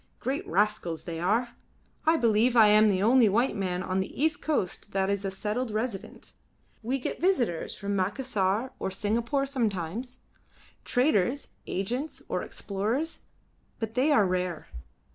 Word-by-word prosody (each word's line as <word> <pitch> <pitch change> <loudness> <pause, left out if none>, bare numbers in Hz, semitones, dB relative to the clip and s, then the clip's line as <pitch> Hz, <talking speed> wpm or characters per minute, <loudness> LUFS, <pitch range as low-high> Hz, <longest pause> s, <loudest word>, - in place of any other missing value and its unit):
Great 270 +3 -2
rascals 185 -3 0
they 165 -2 -5
are. 220 +8 +1 0.6
I 325 +1 +5
believe 230 0 +3
I 220 -3 +7
am 215 +1 +6
the 190 -1 +1
only 235 0 +5
white 235 +6 +2
man 185 -2 -2
on 185 +1 -1
the 190 - -4
east 310 +2 +1
coast 205 - -2
that 195 0 +1
is 200 0 -1
a 195 - -1
settled 215 +6 -3
resident. 215 -1 -5 0.5
We 250 +4 -1
get 260 - -5
visitors 255 - +1
from 200 0 -2
Macassar 205 +2 0
or - - -2
Singapore 230 +8 0
sometimes 235 - -2 0.7
traders, 250 0 +1 0.2
agents, 245 +11 -3
or - - -1
explorers, 220 +11 -2 0.6
but 225 -1 -4
they 265 +5 +2
are 240 -9 +5
rare. 180 -3 -2
215 Hz, 145 wpm, -28 LUFS, 190-255 Hz, 0.7 s, I